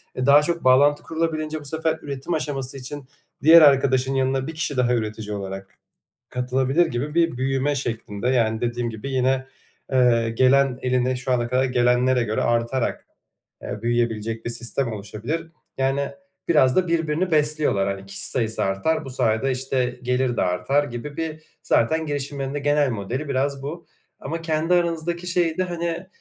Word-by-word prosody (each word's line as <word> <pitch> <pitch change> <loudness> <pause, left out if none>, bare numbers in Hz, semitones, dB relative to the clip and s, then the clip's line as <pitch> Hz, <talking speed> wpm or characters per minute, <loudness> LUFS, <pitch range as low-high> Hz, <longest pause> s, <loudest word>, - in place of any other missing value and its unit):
E, 130 - -1
daha 140 +2 +7
çok 170 +2 -2
bağlantı 140 +3 +4
kurulabilince 155 -1 -2
bu 150 - -13
sefer 160 +2 -1
üretim 140 +4 -4
aşaması 135 -4 -3
için 135 +2 -7 0.4
diğer 165 +2 +9
arkadaşın 135 -2 +4
yanına 135 +1 0
1 160 - -5
kişi 150 -3 -2
daha 125 -1 +2
üretici 110 -2 -3
olarak 95 0 -7 0.5
katılabilir 130 +6 +1
gibi 140 +6 -4
bir 165 -6 +2
büyüme 135 +2 0
şeklinde. 115 -3 -3
Yani, 110 -3 +1
dediğim 120 0 -1
gibi 115 +5 -6
yine, 130 0 +1 0.5
eee, 120 -3 +3
gelen 130 0 +4
eline 125 0 +1
şu 125 +1 -4
ana 120 -1 +1
kadar 130 +2 +1
gelenlere 125 0 +2
göre 110 -1 -1
artarak, 120 +2 -1 0.6
eee, 105 +1 -6
büyüyebilecek 115 -1 -1
bir - - -2
sistem 120 +1 -2
oluşabilir. 110 +11 -5 0.3
Yani, 135 +1 0 0.4
biraz 130 -6 +4
da 185 -1 +2
birbirini 165 +2 0
besliyorlar. 150 -10 +2
Hani, 100 0 -5
kişi 100 - -2
sayısı 110 -3 0
artar, 100 +12 0
bu 135 - -7
sayede, 125 0 +1
işte, 130 -1 -1
gelir 125 -1 0
de - - +1
artar 135 +11 +1
gibi 140 +3 -7
bir, 155 -1 -4 0.2
zaten, 160 +7 +1
girişimlerin 140 -1 -3
de 145 - -1
genel 145 -1 +2
modeli 120 +7 -4
biraz 140 0 -1
bu 165 +4 -6 0.3
ama 165 +4 -5
kendi 165 +2 +1
aranızdaki 170 0 -1
şeyde, 175 -1 +1
hani, 170 0 -3
130 Hz, 160 wpm, -23 LUFS, 120-150 Hz, 0.6 s, diğer